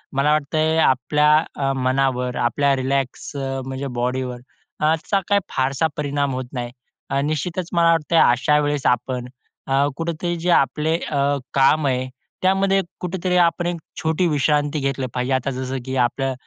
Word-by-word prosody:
मला 140 +2 +3
वाटतं 155 +2 +1
आपल्या 150 +4 +2 0.3
अ, 135 -1 0
मनावर 130 -1 0
आपल्या 140 +4 +2
रिलॅक्स 135 0 -2
अ, 135 -1 -3
म्हणजे 135 +1 -4
बॉडीवर 125 +1 -2 0.4
अ, - - 0
याचा 165 +5 +1
काही 205 0 +3
फारसा 135 +4 0
परिणाम 145 -1 -1
होत 130 0 -3
नाही. 120 -2 -4 0.4
अ, 135 - 0
निश्चितच 165 +4 -2
मला 170 -1 +4
वाटतं 165 0 +1
अशा 140 +5 +2
वेळेस 145 -1 -1
आपण 125 +1 0 0.4
अ, 135 +1 +2
कुठेतरी 170 +1 -2
जे 170 +2 -2
आपले 150 +2 +2
अ, 140 -1 +1 0.2
काम 140 +2 +4
आहे, 130 -1 0 0.3
त्यामध्ये 195 +1 +3 0.2
कुठेतरी 180 0 -1
आपण 175 +1 -2
एक 175 - -1 0.3
छोटी 160 +3 +1
विश्रांती 150 0 +1
घेतली 135 -1 -1
पाहिजे. 125 +1 -1
आता 130 +1 0
जसं 130 +1 -4
की 130 0 -4
आपलं 130 +2 0
140 Hz, 155 wpm, -21 LUFS, 130-160 Hz, 0.4 s, मला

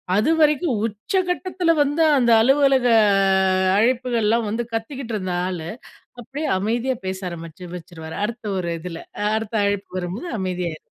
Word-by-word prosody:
அதுவரைக்கும் 300 - +2
உச்சகட்டத்துல 360 - -1
வந்து 290 +3 +2
அந்த 240 -2 +3
அலுவலக 270 0 +4 0.9
அழைப்புகள்லாம் 235 -2 +1
வந்து, 230 +3 -1
கத்திக்கிட்டு 230 +1 -4
இருந்த 185 -3 -3
ஆளு 170 -3 -5 0.5
அப்டியே 290 +6 -5
அமைதியா 235 +5 -1
பேச 190 0 -3
ஆரம்பிச்சு, 165 +1 -9
வச்சுருவாரு 160 -2 -9
அடுத்த 235 0 -5
ஒரு 170 -2 -2
இதுல 170 -1 -7 0.3
அடுத்த 220 0 -2
அழைப்பு 200 -2 -2
வரும்போது 185 - -5
அமைதியாயி 180 -4 -3
225 Hz, 120 wpm, -22 LUFS, 185-270 Hz, 0.9 s, அலுவலக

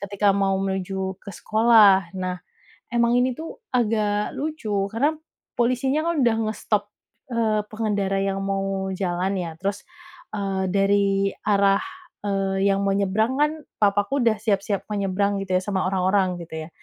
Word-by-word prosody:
ketika 200 0 +1
mau 195 -1 +1
menuju 190 0 -3
ke 200 - -8
sekolah. 215 -5 +5
Nah, 185 -1 -3 0.6
emang 235 0 +3
ini 250 0 +1
tuh 325 +8 -8 0.2
agak 210 -3 +1
lucu, 300 -7 -4 0.2
karena 275 +7 +2 0.5
polisinya 265 +6 +1
kan 340 - +1
udah 230 -2 +3
nge-stop, 210 -1 -1 0.5
eee, 220 -2 +1
pengendara 200 -3 -1
yang 195 0 -1
mau 195 0 -2
jalan 185 +1 -1
ya, 170 -2 -4
terus, 200 +1 -2 0.5
eee, 195 -2 -1
dari 195 0 +2
arah, 200 -1 +3 0.4
eee, 195 -1 0
yang 195 0 +2
mau 195 - +2
nyebrang 205 +5 +1
kan 300 +1 +3 0.3
papaku 205 +6 +2
udah 220 -2 +3
siap-siap 200 -2 0
mau - - -1
nyebrang 200 +1 0
gitu 185 -1 -1
ya, - - -1
sama 190 -2 -1
orang-orang 185 -1 +1
gitu 160 -1 -7
ya. - - -17
200 Hz, 150 wpm, -23 LUFS, 195-220 Hz, 0.6 s, sekolah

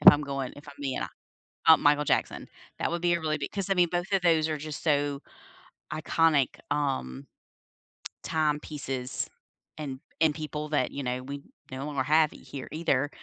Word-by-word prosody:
if 150 - +12
I'm 145 0 +1
going 140 -2 -3
if 145 - -12
I'm 145 - -10
being 135 -2 -2 0.5
ho 160 - +5
uh, - - +4
Michael 145 0 +4
Jackson. - - 0 0.3
That - - +1
would 170 0 -2
be 175 0 +3
a 170 - 0
really 155 -1 0
big 140 - -4
'cause 195 -1 -3
I - - +5
mean, 175 -2 +4
both 175 +3 -2
of 195 -2 +3
those 160 -2 +4
are 155 -1 -1
just 155 0 -6
so 145 -2 +1 0.7
iconic, 155 -3 +2
um. 130 - -1 1.0
Timepieces 150 -4 -1 0.5
and 135 -3 -4 0.2
and 155 -2 +4
people 150 -1 -4
that, 145 -4 +1
you 140 - -4
know, 125 0 -2
we 140 +1 -6 0.3
no 135 +2 -4
longer 140 -3 -1
have 155 +2 +4
it - - -11
here 135 -2 -8
either. 145 -3 +1
150 Hz, 185 wpm, -28 LUFS, 140-160 Hz, 1.0 s, if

